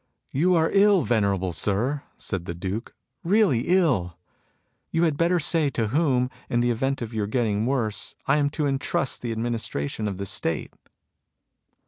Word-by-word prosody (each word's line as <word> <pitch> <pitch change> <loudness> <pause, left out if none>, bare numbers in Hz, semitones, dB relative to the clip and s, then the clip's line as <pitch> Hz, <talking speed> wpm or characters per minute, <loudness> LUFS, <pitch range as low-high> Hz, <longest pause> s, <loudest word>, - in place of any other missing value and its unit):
" - - -46
You 175 +6 +3
are 160 -1 +2
ill, 200 -2 +5
venerable 100 -6 +1
Sir,'* 110 - 0 0.2
said 90 -4 -3
the 85 - -5
Duke, 95 +6 -5 0.2
" 130 - -53
really 180 - +3
ill. 130 - +2 0.7
You 165 - +1
had 160 -4 +2
better 170 +3 +2
say 155 -1 +1
to 115 -5 -1
whom, 130 -2 +1 0.2
in 120 - +1
the 120 0 +2
event 135 +2 -1
of 115 0 -7
your 105 -2 -1
getting 110 -2 0
worse, 110 -7 -1
I 140 - +3
am 145 -1 +2
to 150 - +1
entrust 135 -1 -1
the 120 - -3
administration 110 -6 -2
of 100 -3 -3
the 100 - -4
State." - - -2
125 Hz, 170 wpm, -25 LUFS, 105-150 Hz, 0.7 s, ill